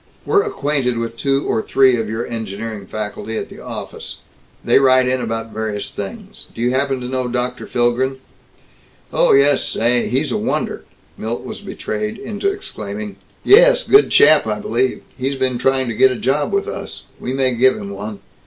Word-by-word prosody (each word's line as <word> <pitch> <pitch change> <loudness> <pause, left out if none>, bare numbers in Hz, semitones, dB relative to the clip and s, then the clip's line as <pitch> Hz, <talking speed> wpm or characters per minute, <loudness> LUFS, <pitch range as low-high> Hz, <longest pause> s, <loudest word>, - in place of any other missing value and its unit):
We're 405 - +4
acquainted 145 - -1
with 115 0 -3
two 135 +3 0
or 110 - +1
three 130 +1 +4
of 110 -2 -2
your 110 +2 -3
engineering 110 -2 -6
faculty 110 +2 -5
at - - -4
the - - -12
Office. - - -7 0.5
They - - +5
write 130 -1 +4
in 130 0 0
about 115 -1 -4
various 110 -1 -3
things. 100 -1 -8
Do - - -10
you 120 +1 +2
happen 135 0 0
to 125 - -5
know 130 -1 -2
Dr. 125 0 -3
Philgren?" 125 +2 +1 1.0
"Oh - - +4
yes. 140 +1 +4
Say! 120 +1 +1
He's 135 +2 0
a - - 0
wonder!" - - -2 0.3
Milt 115 +2 -4
was - - -7
betrayed 105 0 -4
into 210 - -2
exclaiming. 105 - -7 0.3
"Yes. - - +6
Good 415 +1 +6
chap, 150 -5 +6
I 105 -1 -1
believe. 125 +5 -1 0.2
He's 135 +2 -1
been 130 -2 -1
trying 135 0 +2
to - - -2
get 130 - +6
a - - -2
job 130 +6 0
with 400 +1 0
us. - - -6 0.2
We 125 - -4
may 130 -1 +1
give 130 +2 +4
him 100 -1 -7
one. 100 +1 -7
125 Hz, 180 wpm, -19 LUFS, 110-135 Hz, 1.0 s, Yes